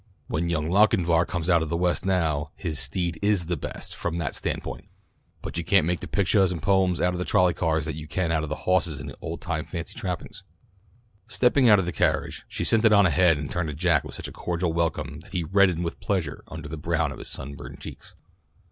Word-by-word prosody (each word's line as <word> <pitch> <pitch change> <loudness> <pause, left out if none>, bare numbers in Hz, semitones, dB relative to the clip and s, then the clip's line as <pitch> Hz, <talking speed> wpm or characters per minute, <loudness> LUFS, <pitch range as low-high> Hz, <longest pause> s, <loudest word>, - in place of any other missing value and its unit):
When 85 +2 -2
young 80 -2 0
Lochinvar 90 -3 +3
comes 85 -2 -3
out 85 -3 +4
of 80 - -3
the 85 - 0
West 90 +1 +1
now, 80 -6 +1
his 80 -5 -3
'steed 85 +5 0
is 100 -4 +2
the 85 +1 -1
best' 75 - -6
from 85 0 -3
that 80 -5 -2
standpoint, - - -4 0.6
but - - -4
you - - -2
can't 95 0 +4
make 90 +1 0
the - - -7
pictuahs 100 -1 +2
and 85 - -3
poems 95 +1 +2
out 90 0 +2
of 90 0 -2
trolley 90 -3 +4
cars 80 -2 0
that 80 - -3
you 75 +1 -8
can 85 +2 -1
out 80 -1 +1
of 80 - -4
hawses 85 -1 0
in 70 - -7
those 70 - -8
old - - -5
time - - -3
fancy - - -6
trappings." 95 +3 -5 0.9
Stepping 125 0 +3
out 105 - +8
of 95 - 0
the 90 - -2
carriage, - - 0
she - - -4
sent 115 0 +2
it 110 - +6
on 100 -1 +6
ahead 85 -1 +4
and 70 -1 -5
turned 85 -2 -1
to 75 - -5
Jack 80 -2 +2
with - - -9
such - - -6
a - - -8
cordial 85 -1 -2
welcome 85 -2 -1
that 80 - -17
he 90 -3 0
reddened 90 0 +3
with 85 - -4
pleasure 90 -8 -2
under 80 -1 -7
the 80 +2 -6
brown 75 - 0
of - - -8
his - - -7
sunburned 70 -1 -8
cheeks. - - -10
85 Hz, 230 wpm, -25 LUFS, 80-95 Hz, 0.9 s, out